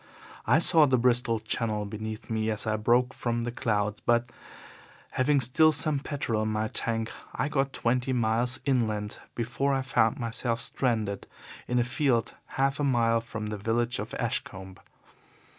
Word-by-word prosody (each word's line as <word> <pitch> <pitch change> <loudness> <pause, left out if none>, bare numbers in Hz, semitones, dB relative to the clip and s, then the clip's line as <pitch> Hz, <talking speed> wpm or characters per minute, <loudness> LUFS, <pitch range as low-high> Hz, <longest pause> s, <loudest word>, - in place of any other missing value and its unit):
I - - +5
saw 160 -2 +5
the 130 -1 +3
Bristol 120 -2 +2
Channel 110 -1 -2
beneath 110 +2 -6
me 110 -1 -1
as 105 -1 -2
I 110 -1 +1
broke 120 +4 +2
from 120 -1 -2
the 120 - -2
clouds, 105 -3 -1
but, 120 0 +1 0.8
having 140 +2 +2
still 135 +6 +4
some 145 0 0
petrol 135 -6 -2
in 110 - -1
my 110 0 -1
tank, 115 0 0 0.2
I - - 0
got 135 -2 0
twenty 125 +1 0
miles 120 +1 +1
inland 110 -6 0 0.2
before 135 +4 0
I 135 - -1
found 120 0 +2
myself 115 -1 -2
stranded 110 -7 -1 0.4
in 125 - 0
a 120 - +4
field 130 -2 0 0.2
half 135 +1 +1
a - - 0
mile 115 -4 +2
from 110 -2 -6
the 105 - -3
village 115 +4 0
of - - -5
Ashcombe. 95 0 -4
120 Hz, 160 wpm, -28 LUFS, 110-130 Hz, 0.8 s, I